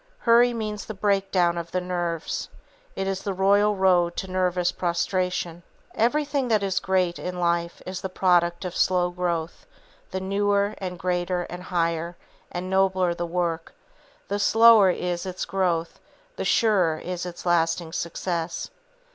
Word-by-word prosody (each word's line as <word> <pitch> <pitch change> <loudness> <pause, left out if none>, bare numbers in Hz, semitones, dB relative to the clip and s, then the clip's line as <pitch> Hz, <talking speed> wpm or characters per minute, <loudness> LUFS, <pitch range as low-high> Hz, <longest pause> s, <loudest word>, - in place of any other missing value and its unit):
Hurry 240 - +4
means 215 -3 -4
the 215 - -7
breakdown 195 -4 +1
of 170 0 -7
the 185 - -1
nerves. 175 -2 -3 0.5
It 195 - -2
is 195 0 -2
the 200 -2 -3
royal 200 +2 +3
road 180 -3 +3
to 190 - -4
nervous 180 -1 +1
prostration. 175 -1 -1 0.3
Everything 280 +3 +1
that 215 -3 +2
is 195 0 0
great 185 -3 0
in 180 0 -5
life 170 0 -1
is 185 0 -5
the 190 - -4
product 175 -1 +2
of 180 - -5
slow 180 -1 +2
growth; 175 -2 -3 0.4
the 190 - -3
newer, 200 +1 +1
and 180 -2 -5
greater, 180 0 -1
and 175 +1 -8
higher, 170 -1 -2 0.3
and 180 +1 -4
nobler 190 -2 +2
the 170 0 -4
work, 170 -1 -2 0.5
the 200 +1 -2
slower 225 -1 +6
is 180 0 -2
its 185 0 -4
growth, 175 -3 -1 0.4
the - - -4
surer 190 -9 +3
is 180 +2 -5
its 175 0 -9
lasting 165 -1 +1
success. 170 0 -3
180 Hz, 150 wpm, -25 LUFS, 175-195 Hz, 0.5 s, slower